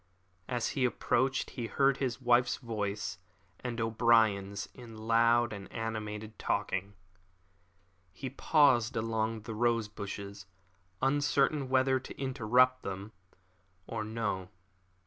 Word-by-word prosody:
As 120 -2 -1
he 135 - -1
approached 130 +2 +1
he 120 -3 -4
heard 135 +1 +2
his 130 -3 -2
wife's 120 -1 +3
voice 105 -6 -3 0.4
and 120 -2 -4
O'Brien's 110 -3 +2
in 115 -3 -11
loud 115 +1 +3
and 100 -1 -9
animated 110 -1 -5
talk. - - -1 1.4
He 130 - -6
paused 130 -5 +3
among 110 0 -1
the 110 +1 -6
rose 115 0 +1
bushes, 100 -1 -7 0.6
uncertain 145 0 +2
whether 130 0 +3
to 130 - -11
interrupt 130 -1 +3
them 100 +2 -6 0.7
or 110 +1 -4
no. 105 -4 -3
115 Hz, 110 wpm, -31 LUFS, 110-130 Hz, 1.4 s, wife's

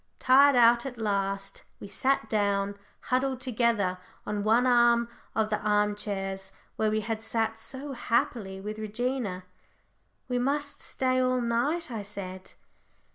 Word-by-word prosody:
Tired 275 +2 +6
out 235 0 +6
at 250 -2 -7
last, 195 -2 -2 0.2
we - - -8
sat 240 +4 0
down, 200 -2 0 0.4
huddled 260 0 +1
together, 230 -7 0 0.3
on 205 -1 -2
one 225 +4 +4
of 235 -2 +2
the 210 - +1
arm 210 0 +2
chairs, 195 -2 -4 0.2
where 220 0 +1
we 215 0 0
had 220 +1 -3
sat 225 0 -1
so 265 +5 -6
happily 230 -5 -1
with 210 +2 -6
Regina. 220 -3 -2 0.8
"We 250 -1 0
must 285 +3 -1
stay 255 0 0
all 255 0 +2
night," 250 +8 0
I 225 -3 -3
said. 190 -2 -8
225 Hz, 135 wpm, -28 LUFS, 205-250 Hz, 0.8 s, Tired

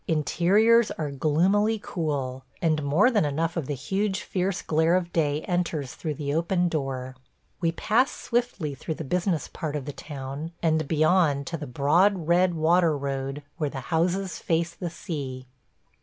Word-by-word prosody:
Interiors 205 +9 +3
are 150 -3 -4
gloomily 185 +10 +2
cool, 140 -6 -3 0.2
and 155 -2 +1
more 155 - +3
than 215 -7 +3
enough 160 +3 -1
of 165 -6 -2
the 145 - -2
huge 195 +8 -1
fierce 185 0 -2
glare 160 +2 +2
of 175 -2 -1
day 150 -2 +1
enters 170 -7 -2
through 155 -2 -4
the 140 0 -3
open 175 +3 +1
door. 135 -5 -3 0.4
We 165 -2 +1
pass 230 +9 +2
swiftly 235 - -2
through 155 +3 -5
the 160 - -5
business 175 +2 0
part 150 -2 -5
of 145 -3 -3
the 145 - -5
town, 145 +3 -7
and 160 -2 +2
beyond 155 -2 +3
to 165 +4 -4
the 150 -2 -6
broad 160 +7 +2
red 175 +1 +3
water 165 0 +3
road 135 +1 -3
where 150 -3 -1
the 135 - -6
houses 180 +3 0
face 170 +1 0
the 175 0 -5
sea. 135 -6 -6
160 Hz, 165 wpm, -26 LUFS, 145-180 Hz, 0.4 s, Interiors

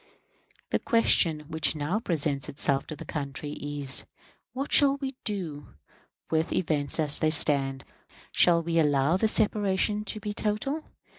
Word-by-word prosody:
The - - +1
question 190 - +3
which 160 +1 0
now 155 +8 -1
presents 150 - -2
itself 140 -1 -1
to 155 - -6
the - - -10
country 145 0 -5
is, 145 -2 0 0.5
What 270 +4 -5
shall 280 -1 +5
we 270 -1 -5
do 165 - -5 0.6
with 160 +1 0
events 150 -4 0
as 150 -2 +1
they 155 - +2
stand? 140 -3 +1 0.5
Shall 170 -1 +4
we 165 0 0
allow 145 +1 +2
this 220 +2 +2
separation 210 0 +1
to 215 - -4
be 210 0 -5
total? 220 +10 -2
160 Hz, 145 wpm, -27 LUFS, 145-210 Hz, 0.6 s, shall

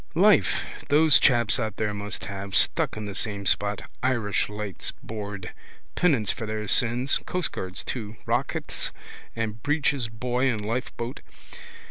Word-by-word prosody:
Life - - +5 0.3
those 150 0 +7
chaps 120 -3 +4
out 110 -3 -2
there 105 -1 0
must 100 0 -5
have, 100 -1 -5
stuck - - +2
in 105 - -4
the 100 - -5
same 100 -1 -2
spot. 100 0 +1 0.2
Irish 120 -7 +1
Lights 105 -3 -4
board. 100 -4 -6 0.4
Penance 135 - +2
for 110 - -5
their 105 0 -3
sins. 125 +5 +2
Coastguards 115 - -2
too. 110 -3 -4
Rocket - - -1 0.5
and 110 -1 -3
breeches 140 -3 +1
buoy 125 +4 0
and 105 -4 -2
lifeboat. 120 +1 -3
110 Hz, 135 wpm, -26 LUFS, 105-125 Hz, 0.5 s, those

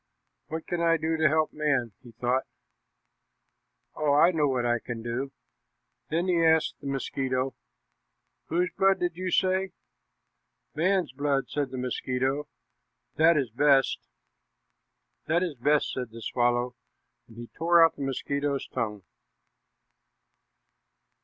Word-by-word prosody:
"What 160 +1 -5
can 175 -1 -2
I 165 0 +3
do 160 0 -1
to 160 -1 +3
help 155 +1 +1
man?" 140 -6 0
he 125 - -14
thought. 125 +3 -1 1.5
"Oh, 150 -2 +1
I 170 +4 +6
know 155 -4 +1
what 130 -3 0
I 120 0 +1
can 115 -2 -6
do." 125 +4 -3 0.8
Then 170 +4 0
he 170 -2 +2
asked 160 -1 +3
the 140 - -7
mosquito, 135 -1 -2 0.9
"Whose 180 +3 0
blood 195 0 +3
did 175 -1 -1
you 185 +1 -3
say?" 190 +1 +1 1.0
"Man's 180 -1 +1
blood," 140 0 -1
said 145 -2 -1
the 130 - -6
mosquito; 130 +3 -2 0.7
"that 160 +1 +5
is 135 -6 -1
best." 135 +2 +3 1.3
"This 170 +3 +2
is 175 -4 -2
best," 145 +3 +1
said 125 -2 -4
the 115 0 -10
swallow, 120 0 0 0.5
and 115 - -16
he 120 0 -8
tore 170 0 +5
out 165 - 0
the - - -9
mosquito's 140 +1 -2
tongue. 105 -5 -3
145 Hz, 135 wpm, -27 LUFS, 125-165 Hz, 1.5 s, I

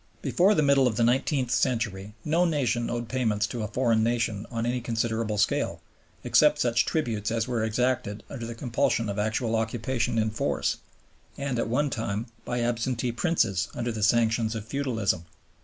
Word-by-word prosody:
Before 195 +4 +3
the 155 - +3
middle 140 -2 +4
of 115 - -1
the 115 - +2
nineteenth 130 +1 +1
century 105 -6 -1
no 165 +4 +3
nation 125 -8 0
owed 120 -1 -3
payments 110 -4 0
to 115 +1 -4
a 105 - -2
foreign 115 0 +2
nation 115 -3 0
on 115 -1 -2
any 125 +1 -1
considerable 115 -2 -1
scale, 105 - +1 0.4
except 150 0 +4
such 120 -4 +2
tributes 115 -10 -1
as 115 0 -1
were 120 -3 -1
exacted 110 -2 -1
under 120 -4 -6
the 120 - -6
compulsion 115 -2 0
of 100 +1 -3
actual 110 +2 0
occupation 115 +1 -1
in 110 -1 +1
force 110 - -1 0.6
and, 140 -4 -2
at 115 - 0
one 140 +4 +1
time, 110 -1 -2 0.2
by 120 0 -2
absentee 120 +1 -1
princes 115 - +1
under 120 0 -2
the 110 -1 -5
sanctions 115 0 +2
of 110 -2 -5
feudalism. 110 -9 -1
115 Hz, 175 wpm, -27 LUFS, 110-125 Hz, 0.6 s, middle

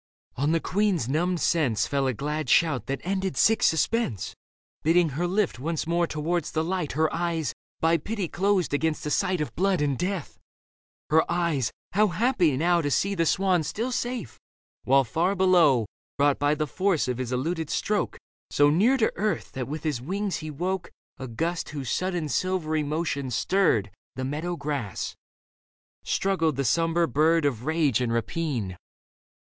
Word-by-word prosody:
On 145 +4 +1
the 165 - +2
queen's 190 - 0
numbed 170 +6 0
sense 130 - +1
Fell 140 -1 0
a 130 - +1
glad 150 +2 -3
shout 140 -8 +3
that 135 0 -3
ended 190 0 -2
sick 225 -1 +4
suspense, 160 - +1 0.5
Bidding 165 +1 +3
her 160 +6 -2
lift 190 - 0
once 160 +3 -2
more 170 +1 +1
towards 160 +2 -2
the 160 - 0
light 175 -2 -2
Her 155 +2 +1
eyes, 165 -6 -1 0.3
by 165 +1 +4
pity 200 +3 -3
closed 190 -2 0
against 155 +1 0
a 150 - -2
sight 185 +1 +1
Of 150 - -3
blood 190 +1 +1
and 145 -2 +1
death 180 +1 -4 0.3
— - - -35
^her 160 +1 +5
eyes, 165 -9 0 0.2
how 210 +3 +4
happy 180 - +2
now 170 +3 +3
To 145 - -1
see 195 +8 +1
the 165 -4 +1
swan 185 -1 +2
still 225 - -3
safe, 245 - -3 0.5
while 135 +1 +5
far 170 - 0
below, 170 - +4 0.3
Brought 145 0 +3
by 145 +1 +2
the 155 0 -1
force 185 0 0
of 125 -1 -2
his 130 -1 -3
eluded 160 +5 -2
stroke 205 +5 -1 0.3
So 145 0 +4
near 220 - +4
to 220 - +1
earth 210 +1 -1
that 130 -2 -4
with 150 +2 -5
his 150 -7 -1
wings 195 +7 -2
he 155 - -6
woke 180 +5 -3 0.3
A 130 - -5
gust 165 +9 -2
whose 140 -5 -4
sudden 180 -4 -1
silvery 160 0 0
motion 150 -2 -2
stirred 115 - +1 0.2
The 130 - -3
meadow 155 +6 -3
grass, 145 - -4 0.9
struggled 165 -6 0
the 140 +1 -1
sombre 165 +5 +2
bird 155 +4 +3
Of 125 -4 -1
rage 155 -7 +2
and 120 -2 0
rapine. 115 - -2
160 Hz, 170 wpm, -26 LUFS, 140-180 Hz, 0.9 s, ^her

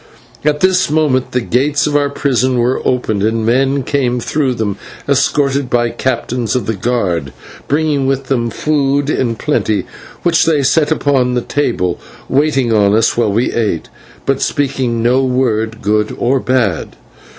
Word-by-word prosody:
At 150 0 +1
this 185 -2 +3
moment 145 -4 +1
the 125 - 0
gates 140 +5 +1
of 150 - -1
our 145 -1 +2
prison 130 -3 0
were 120 +2 +1
opened, 110 -5 0
and 110 +1 0
men 135 +3 +1
came 125 -2 0
through 135 0 -1
them, 105 -3 -2 0.3
escorted 140 -1 +1
by 120 -1 +1
captains 120 -2 -2
of 125 -5 -1
the 110 - -1
guard, 95 - -1 0.4
bringing 145 -2 +1
with 135 0 0
them 120 -3 -1
food 145 +1 0
in 120 -5 0
plenty, 110 -6 -1 0.4
which 170 -2 +3
they 155 -4 +2
set 150 +3 +2
upon 135 -5 +1
the 125 - +1
table, 115 -11 -1 0.3
waiting 135 -4 +1
on 105 -1 +3
us 115 0 +2
while 115 -3 +1
we 115 +5 0
ate, 105 -8 -1 0.4
but 135 -1 0
speaking 130 -5 -1
no 125 +3 +3
word, 115 -4 -1
good 105 +1 0
or 130 +3 +1
bad. 120 -10 -1
130 Hz, 160 wpm, -15 LUFS, 115-140 Hz, 0.4 s, this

